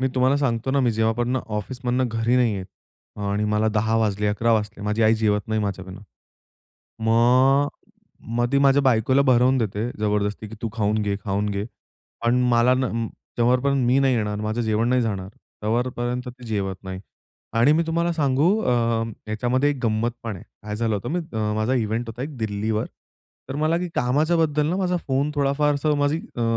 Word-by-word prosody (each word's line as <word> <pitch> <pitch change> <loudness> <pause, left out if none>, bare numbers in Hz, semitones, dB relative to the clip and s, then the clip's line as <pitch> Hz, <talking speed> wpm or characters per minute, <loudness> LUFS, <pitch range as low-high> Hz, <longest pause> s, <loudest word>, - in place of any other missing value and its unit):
मी 130 - +1
तुम्हाला 130 +2 +3
सांगतो 130 -3 -1
ना, 140 +1 +2
मी 125 -3 +2
जेव्हापर्यंत 115 +3 0
ऑफिसमधनं 125 +4 -2
घरी 115 +2 +1
नाही 120 -4 +2
येत 95 -1 -6 0.6
आणि 100 +1 0
मला 105 +1 +1
10:00 110 +1 +1
वाजले 105 -1 0
11:00 115 +3 +1
वाजले 105 -1 -1
माझी 105 +2 0
आई 110 +1 +5
जेवत 105 -2 +1
नाही 110 0 0
माझ्याबिना. 95 -1 -5 1.0
मग, 130 +5 +4 0.7
मग 120 +1 0
ती 140 - +4
माझ्या 140 0 +4
बायकोला 130 +1 +3
भरवून 130 0 +4
देते, 110 +1 -2
जबरदस्ती 105 0 -1
की 110 - -9
तू 115 - -1
खाऊन 110 -1 0
घे, 100 -1 -1
खाऊन 100 +1 -1
घे. 100 0 -2 0.6
पण 120 +1 +3
मला 120 +2 +4
ना, 130 0 0 0.5
जोपर्यंत 125 +2 +2
मी 130 +3 +4
नाही 135 -2 +3
येणार 105 -2 -2
माझं 110 +2 -2
जेवण 110 +1 +1
नाही 125 0 +2
जाणार 100 -4 -3 0.3
तेव्हापर्यंत 120 +2 -1
ती 125 -1 -11
जेवत 100 -3 -2
नाही. 95 0 -6 0.6
आणि 135 +6 +5
मी 165 - +3
तुम्हाला 170 +1 0
सांगू, 145 0 +2
अ, 115 -2 +1 0.2
याच्यामध्ये 125 +6 +1
एक 145 - -2
गंमत 110 +2 +1
पण 110 -4 -4
आहे. - - -12 0.2
काय 105 0 -5
झालं 110 -1 0
होतं, 105 +4 -4
म 175 - -1 0.2
मी 105 -1 -1
माझा 110 +4 +1
इव्हेंट 115 0 -1
होता 115 +3 -6
एक 145 -1 -6
दिल्लीवर. 110 0 -1 0.6
तर 135 - -4
मला 155 +2 +1
की 180 0 -3
कामाच्याबद्दल 150 +3 +1
ना 180 - 0
माझा 180 -2 0
फोन 135 +3 +1
थोडाफार 145 +1 +1
असं 150 +1 +1
माझी 145 +2 +1 0.2
अ, 120 - -1
120 Hz, 185 wpm, -23 LUFS, 110-130 Hz, 1.0 s, आई